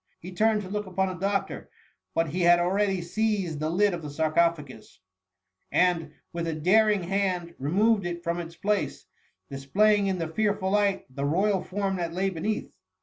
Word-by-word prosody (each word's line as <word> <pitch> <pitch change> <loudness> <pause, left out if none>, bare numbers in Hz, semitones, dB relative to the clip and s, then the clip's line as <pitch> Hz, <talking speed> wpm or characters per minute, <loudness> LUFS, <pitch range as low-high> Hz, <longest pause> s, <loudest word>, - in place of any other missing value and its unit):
He 180 - -9
turned 215 +3 +2
to - - -8
look 210 +1 -4
upon 190 +1 0
the - - -4
doctor, 195 +2 -2 0.5
but 165 -1 +1
he 180 +5 -2
had 175 0 +6
already 190 +1 +1
seized 195 -4 -1
the 155 +1 -1
lid 200 +4 +2
of 170 - -4
the 150 - -6
sarcophagus, 155 -4 -1 0.7
and, 170 -4 +1 0.2
with 170 0 -3
a 160 - -2
daring 205 +5 +3
hand, 180 -2 -1
removed 195 +7 +2
it 175 0 -5
from 170 0 -1
its 170 0 -7
place, 205 +3 -2 0.5
displaying 200 +10 +2
in 190 -1 0
the 165 -2 -2
fearful 200 +2 0
light 205 -1 +1
the 140 - -3
royal 190 +6 +1
form 195 0 -2
that 170 -2 -3
lay 195 +1 0
beneath. 200 +5 -3
180 Hz, 175 wpm, -27 LUFS, 170-200 Hz, 0.7 s, had